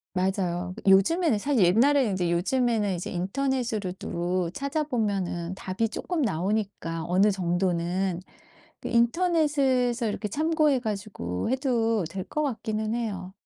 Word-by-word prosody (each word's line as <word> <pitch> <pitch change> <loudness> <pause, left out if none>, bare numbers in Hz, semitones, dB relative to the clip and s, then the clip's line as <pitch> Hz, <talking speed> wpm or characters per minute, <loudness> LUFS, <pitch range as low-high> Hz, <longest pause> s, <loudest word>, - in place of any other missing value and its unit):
맞아요. 180 -1 -1
그 195 - +3
요즘에는 245 - +4
사실 250 -2 +2
옛날에는 240 +4 +4
이제 175 -2 0
요즘에는 210 +1 +1
이제 175 - -5
인터넷으로도 185 -5 -2
찾아보면은 210 - -2
답이 190 +4 -2
쪼끔 340 +7 -3
나오니까, 190 -4 -2
어느 190 +4 +4
정도는. 180 0 0 0.6
그 - - -3
인터넷에서 260 -3 +2
이렇게 210 0 -3
참고해 310 - +2
가지고 200 - -4
해도 235 - +1
될 190 +2 -5
것 305 - -2
같기는 220 -4 -2
해요. 195 -6 -4
210 Hz, 310 characters per minute, -26 LUFS, 185-255 Hz, 0.6 s, 요즘에는